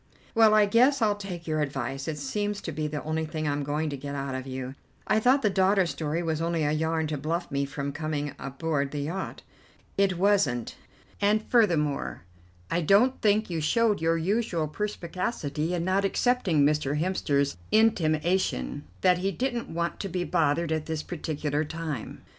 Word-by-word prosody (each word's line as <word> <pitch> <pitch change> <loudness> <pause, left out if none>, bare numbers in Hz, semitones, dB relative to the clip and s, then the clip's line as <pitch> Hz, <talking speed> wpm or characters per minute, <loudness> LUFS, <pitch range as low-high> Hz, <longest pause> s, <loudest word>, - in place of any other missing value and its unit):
"Well, 220 -2 +6
I 210 -1 +6
guess 250 +7 +4
I'll 215 -3 +2
take 185 -4 -7
your 155 -1 0
advice; 135 -1 -3
it 155 -2 -2
seems 205 +8 -2
to 165 - -4
be 155 0 -2
the 150 -1 -4
only 155 +1 -1
thing 155 0 -3
I'm 145 0 0
going 150 +2 -1
to - - -3
get 140 +1 -6
out 135 -1 -3
of 130 0 -5
you. 130 0 -5 0.3
I - - +3
thought 255 +4 +3
the 210 - +4
daughter 190 0 +3
story 165 0 -2
was 160 -1 -1
only 165 -1 0
a 145 - +1
yarn 160 +1 0
to 150 -2 -3
bluff 165 +3 -2
me 140 0 0
from 140 0 -4
coming 150 -1 -3
aboard 140 +1 -2
the 145 0 -4
yacht." 170 +7 -4 0.6
"It 195 -3 +3
wasn't, 175 - +2 0.5
and 210 +2 +3
furthermore, 165 - +2 0.5
I 175 - +1
don't 205 - +4
think 210 -2 +2
you 165 -2 -1
showed 215 +4 +2
your 165 0 +2
usual 175 -2 0
perspicacity 170 -3 -3
in 170 -1 -2
not 190 +2 +2
accepting 195 - +2
Mr. 150 -1 +1
Hemster's 145 -5 0 0.2
intimation 165 - +1 0.2
that 180 -1 +4
he 195 +2 0
didn't 240 +3 -2
want 170 +1 -2
to 195 - -3
be 180 0 -1
bothered 165 -1 +1
at 155 -1 -1
this 160 -1 -3
particular 150 -3 -2
time." 155 -5 -5
160 Hz, 180 wpm, -27 LUFS, 150-195 Hz, 0.6 s, Well